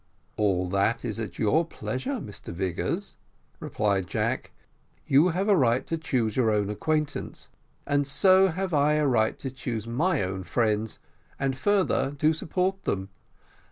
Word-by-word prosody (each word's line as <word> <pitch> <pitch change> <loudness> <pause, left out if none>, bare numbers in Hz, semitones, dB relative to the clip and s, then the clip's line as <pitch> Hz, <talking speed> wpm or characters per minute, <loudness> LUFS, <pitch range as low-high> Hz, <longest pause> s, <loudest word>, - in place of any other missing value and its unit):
"All 95 -4 +1
that 100 +6 +1
is 115 -2 -3
at 110 - -5
your 140 +10 +3
pleasure, 130 - -4
Mr 105 - -9
Vigors," 90 0 -3 0.4
replied 100 -4 -1
Jack, 80 - -1 0.6
"you 145 +6 +5
have 185 +3 0
a 205 - +5
right 125 -6 +2
to 165 - -2
choose 125 -9 -1
your 125 -4 +3
own 105 -1 +1
acquaintance, 150 +6 -2 0.4
and 145 -1 +1
so 190 +6 +5
have 185 +1 -3
I 150 0 +3
a 150 0 +2
right 115 -5 +2
to 135 - -5
choose 120 -4 -4
my 150 - +1
own 95 0 -4
friends, 110 +1 0 0.4
and 135 -1 0
further, 145 -4 +1
to 155 +2 +3
support 185 +4 -1
them. 95 0 -2
130 Hz, 155 wpm, -26 LUFS, 105-160 Hz, 0.6 s, you